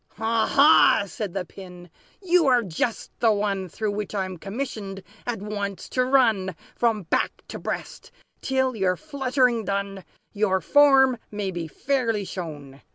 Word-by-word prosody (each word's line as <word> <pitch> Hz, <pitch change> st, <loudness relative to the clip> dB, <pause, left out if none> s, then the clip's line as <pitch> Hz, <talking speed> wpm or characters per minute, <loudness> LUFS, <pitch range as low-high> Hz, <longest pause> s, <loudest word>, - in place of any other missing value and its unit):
"Ha, 225 Hz, +1 st, +1 dB
ha!" 290 Hz, -6 st, +6 dB
said 200 Hz, -1 st, -6 dB
the 190 Hz, -2 st, -2 dB
Pin, 180 Hz, -1 st, -12 dB, 0.4 s
"you 355 Hz, -4 st, +3 dB
are 250 Hz, -2 st, +4 dB
just 195 Hz, +5 st, -3 dB
the 230 Hz, -1 st, +4 dB
one 200 Hz, -3 st, -1 dB
Through 215 Hz, +5 st, -2 dB
which 210 Hz, 0 st, -4 dB
I'm 185 Hz, -2 st, -3 dB
commissioned, 200 Hz, -3 st, -5 dB, 0.2 s
at 225 Hz, -5 st, -3 dB
once, 200 Hz, -2 st, -4 dB
to 255 Hz, -, +1 dB
run 225 Hz, -9 st, +2 dB, 0.2 s
From 225 Hz, -4 st, +1 dB
back 165 Hz, -, -1 dB
to -, -, -6 dB
breast, -, -, -6 dB, 0.3 s
till, 260 Hz, -1 st, 0 dB
your 190 Hz, -3 st, +1 dB
fluttering 260 Hz, -5 st, 0 dB
done, 200 Hz, -1 st, -3 dB, 0.3 s
Your 200 Hz, -3 st, +1 dB
form 270 Hz, -1 st, +5 dB
may 205 Hz, -2 st, -3 dB
be 170 Hz, -2 st, -5 dB
fairly 230 Hz, -, -1 dB
shown. 145 Hz, -7 st, -8 dB
210 Hz, 150 wpm, -24 LUFS, 190-250 Hz, 0.4 s, ha